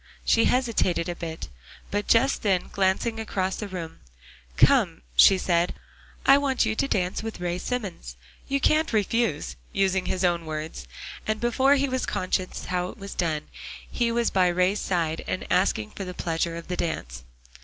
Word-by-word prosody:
She 230 - +4
hesitated 230 -9 +1
a 175 - -3
bit, 165 -1 -6 0.4
but 205 0 -1
just 265 +4 +3
then 190 -4 +1
glancing 200 +4 0
across 190 -3 -2
the 210 - -4
room, 170 -4 -7 0.6
"Come," 60 - +4
she 190 - +7
said, 175 -1 +1 0.5
"I 275 +1 +7
want 270 -4 +1
you 220 - 0
to 275 - 0
dance 180 -7 -1
with 225 0 -6
Ray 175 0 -2
Simmons. 190 - -4 0.3
You 275 0 0
can't 310 0 +2
refuse," 215 -5 0
using 190 -1 +1
his 185 0 0
own 170 -2 0
words; 155 - -5 0.4
and 215 0 0
before 260 +4 +3
he 280 0 +1
was 260 -1 -2
conscious 185 0 -2
how 180 0 -1
it - - -9
was 200 -1 -7
done, 160 -4 -1 0.5
he 235 -1 0
was 235 0 +1
by 185 -2 +3
Ray's 180 +3 +2
side, 165 -3 -1
and 185 - -3
asking 180 - +1
for 195 - -6
the 180 -1 -7
pleasure 165 0 -1
of 170 - -8
the 180 - -3
dance. 60 - -3
185 Hz, 175 wpm, -26 LUFS, 175-225 Hz, 0.6 s, she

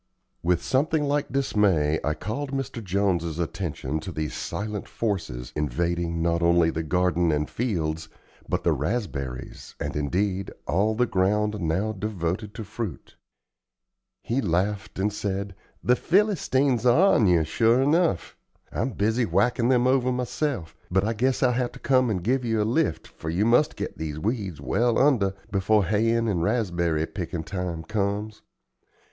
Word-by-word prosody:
With 85 0 +1
something 150 +3 +1
like 145 -1 0
dismay 100 - +2
I 75 0 0
called 135 +8 -4
Mr. 135 -4 -4
Jones's 90 -4 0
attention 80 -4 -3
to 85 +4 -6
these 75 -2 -3
silent 105 -1 -4
forces, 80 - -3
invading, 85 +3 -1
not 85 0 +1
only 85 -1 +4
the 80 - -2
garden 90 0 +1
and 75 0 0
fields, 80 -9 -2 0.4
but - - -1
the - - +3
raspberries 70 - -4
and, - - -3
indeed, 95 +6 -1 0.2
all 105 +5 +1
the 125 +2 +3
ground 105 +1 +1
now 90 +7 0
devoted 100 -1 -3
to 115 - -5
fruit. 105 -4 -6 1.1
He 125 +4 0
laughed 95 +1 -1
and 100 +2 0
said: 100 -1 -3 0.3
"The 125 - +4
Philistines 145 - +2
are 155 +11 +5
on 110 - +4
you, 85 -3 +4
sure 115 +10 +3
enough. 155 - +1 0.4
I'm - - -2
busy 110 +4 +1
whackin' 120 +1 +2
them 125 -1 +4
over 130 -1 +3
myself, 125 - -2
but 95 +2 +2
I 110 +3 0
guess 130 +5 +1
I'll 125 - +4
have 125 0 -1
to - - -11
come 130 -2 +3
and 95 -5 -1
give 130 +5 +1
you 115 -2 0
a - - +3
lift, 125 +9 0
for 80 - -7
you 90 +6 +1
must 120 +6 +3
get - - -5
these 75 -2 -4
weeds 100 - -2
well 115 - +1
under 115 -9 +3 0.2
before 100 +1 +3
hayin' 115 +4 +2
and 95 -6 0
raspberry 85 -7 0
pickin' 85 -2 -5
time 90 -3 -4
comes. 105 +2 -2
100 Hz, 155 wpm, -25 LUFS, 85-120 Hz, 1.1 s, are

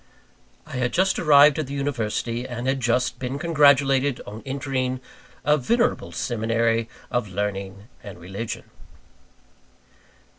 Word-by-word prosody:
I - - -7
had 125 -1 -1
just 190 +1 +2
arrived 150 -1 +6
at 155 - -2
the 140 - -5
University, 120 -3 -2
and 120 0 -5
had 135 +1 +1
just 125 0 0
been 130 +1 -3
congratulated 140 -4 +3
on 105 +2 -8
entering 130 -1 -2 0.5
"a 150 +1 +4
venerable 235 - 0
seminary 115 0 0 0.2
of 120 -3 0
learning 100 +1 -4
and 100 -4 -10
religion." 95 +6 -6
125 Hz, 120 wpm, -24 LUFS, 115-140 Hz, 0.5 s, arrived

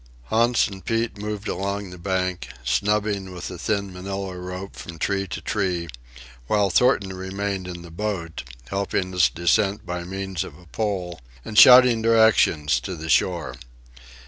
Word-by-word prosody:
Hans 120 +2 +3
and 95 -2 -10
Pete 115 -2 -1
moved 105 0 -4
along 100 0 -3
the 90 - -10
bank, 95 -4 -2 0.2
snubbing 100 - 0
with 90 - -6
a 90 - -8
thin 100 0 -2
Manila 95 0 -5
rope 90 +2 -7
from 85 -1 -9
tree 95 +4 -1
to - - -6
tree, 90 -5 -1 0.6
while 100 - +2
Thornton 100 -4 +3
remained 95 0 -4
in 85 -1 -7
the 85 - -11
boat, 85 -3 -4 0.3
helping 95 -1 -2
its 90 -3 +4
descent 95 +4 +1
by 90 0 -4
means 95 -1 -4
of 70 - -11
a 90 - -18
pole, 90 -4 -3 0.2
and 110 - -7
shouting 125 0 +8
directions 110 - +4
to 80 +9 -6
the 80 0 -7
shore. 85 -5 +1
95 Hz, 155 wpm, -23 LUFS, 90-105 Hz, 0.6 s, shouting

